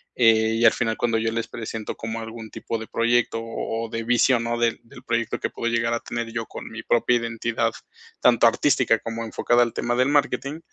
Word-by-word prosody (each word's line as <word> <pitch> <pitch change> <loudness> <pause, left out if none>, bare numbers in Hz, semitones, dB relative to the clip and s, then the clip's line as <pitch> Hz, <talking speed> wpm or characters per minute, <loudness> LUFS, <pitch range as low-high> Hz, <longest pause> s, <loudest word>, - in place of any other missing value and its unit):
eh, 110 -2 +4
y 115 - +3
al 115 - +7
final 115 -2 -1
cuando 115 -2 +1
yo 115 0 0
les 115 0 -2
presento 110 -2 -6
como 115 0 -5
algún 110 0 -8
tipo 115 - -4
de 110 - -7
proyecto 115 0 +1
o 115 0 -4
o - - -16
de 115 0 -4
visión, 120 +1 +3
¿no?, 120 0 -1
del 115 -1 0
del 125 +2 -15
proyecto 115 -2 -1
que - - -2
puedo 115 0 -3
llegar 115 0 +1
a 115 - -2
tener 115 -1 -5
yo 115 -2 -3
con - - -9
mi 110 0 -8
propia 120 +1 +2
identidad, 115 0 -1 0.5
tanto - - +5
artística - - +2
como 115 0 -5
enfocada 120 +2 +2
al 120 - -2
tema 120 0 -1
del 130 +3 +2
marketing, 145 +1 0
115 Hz, 220 wpm, -24 LUFS, 115-120 Hz, 0.5 s, al